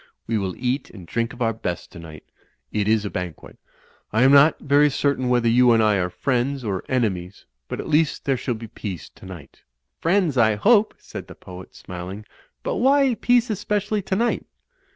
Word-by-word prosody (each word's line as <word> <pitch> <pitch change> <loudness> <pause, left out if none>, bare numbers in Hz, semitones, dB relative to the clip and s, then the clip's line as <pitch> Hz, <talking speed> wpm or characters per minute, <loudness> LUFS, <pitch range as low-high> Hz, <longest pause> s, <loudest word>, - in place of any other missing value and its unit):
We 110 -1 -1
will 95 -2 -3
eat 130 +3 -2
and 95 -5 -12
drink 115 +6 -2
of 120 0 -4
our 115 0 +1
best 90 -5 -5
tonight. 80 -3 -11 0.5
It 105 -1 -1
is 110 -1 +2
a - - -2
banquet. 90 -2 -7 0.5
I 110 +3 +3
am 135 - +6
not 145 +3 +6
very 145 +1 +3
cer 140 +1 +1
tain 130 -1 -2
whether 120 -1 +2
you 120 +1 +5
and 115 -1 +3
I 105 -2 +3
are 90 -1 0
friends 130 +6 -1
or 100 -4 -3
enemies, 100 -7 -2 0.2
but - - -5
at - - -5
least 155 0 +1
there 135 - +2
shall 125 -1 -3
be 115 +1 -8
peace 95 -7 -7
tonight." 95 -6 -12 0.4
"Friends, 170 -6 +1
I 110 -2 +4
hope," 215 - +3
said - - -9
the - - -11
poet, 90 0 -12
smiling, 90 +4 -8 0.4
"but - - -2
why 275 0 +4
peace 245 +1 +2
especially 210 +1 -1
tonight?" 200 +5 -1
120 Hz, 190 wpm, -23 LUFS, 100-150 Hz, 0.5 s, am